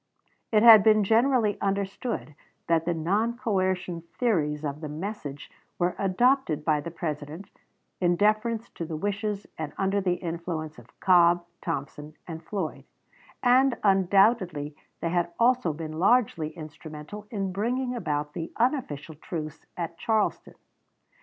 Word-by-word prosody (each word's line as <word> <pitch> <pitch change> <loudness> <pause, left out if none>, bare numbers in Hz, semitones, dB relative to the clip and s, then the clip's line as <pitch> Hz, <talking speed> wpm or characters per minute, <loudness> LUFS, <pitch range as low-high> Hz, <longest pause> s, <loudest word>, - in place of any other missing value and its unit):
It 215 -1 +4
had 225 -3 +10
been 215 0 +5
generally 225 0 +2
understood 195 -2 -2 0.3
that 165 -1 +2
the 175 - +1
non 205 +9 0
coercion 185 -6 -1 0.2
theories 155 -11 0
of 145 +1 -4
the 155 - -5
message 150 -3 -6 0.3
were 175 0 0
adopted 195 - +2
by 150 -2 +2
the 170 - -6
President 155 +1 -6 0.5
in 175 -1 +2
deference 215 +4 +1
to 170 - -5
the 160 0 -5
wishes 205 +2 -2
and 155 -2 -4
under 195 +1 +1
the 180 -2 +1
influence 165 -4 -5
of 120 - -20
Cobb, 175 -2 +5 0.2
Thompson, 150 -1 -5
and 165 -1 -7
Floyd, 185 -3 -4 0.6
and 255 +1 +4
undoubtedly 190 -5 +3 0.3
they 165 - 0
had 175 -1 0
also 245 -6 +3
been 155 +1 -6
largely 195 -6 +3
instrumental 155 +5 -9
in 195 -4 -2
bringing 245 +6 -1
about 150 -8 -2
the 165 -1 -5
unofficial 230 - -1
truce 155 0 -7
at 170 -1 -5
Charleston. 220 -2 0
180 Hz, 135 wpm, -27 LUFS, 155-215 Hz, 0.6 s, had